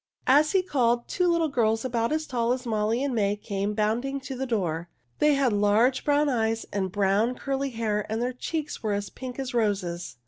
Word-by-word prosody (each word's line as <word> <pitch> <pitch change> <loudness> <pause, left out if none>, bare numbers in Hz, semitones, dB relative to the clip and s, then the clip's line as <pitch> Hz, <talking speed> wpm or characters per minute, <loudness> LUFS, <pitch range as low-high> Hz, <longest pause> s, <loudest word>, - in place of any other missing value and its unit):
As 295 +4 +4
he 380 -1 +3
called, 240 -8 +1
two 360 - +1
little 335 -2 +2
girls 225 -4 +1
about 235 -1 0
as 310 0 0
tall 240 -3 0
as 255 0 -5
Molly 220 +2 0
and 280 -2 -1
May 205 -3 +1
came 205 0 -3
bounding 235 +6 0
to 265 - -6
the 265 +1 -3
door. 175 -7 -1 0.3
They 300 -1 +4
had 270 -5 +2
large 210 +6 +3
brown 295 0 +3
eyes 225 -4 0
and 190 -2 -1
brown, 205 +5 +2
curly 275 +1 -2
hair, 215 -4 -2
and 220 - -1
their 250 +2 -1
cheeks 305 +4 -4
were 215 -2 -1
as 200 -1 -3
pink 255 -2 -7
as 265 -2 -4
roses. 195 -7 -1
235 Hz, 205 wpm, -26 LUFS, 210-270 Hz, 0.3 s, As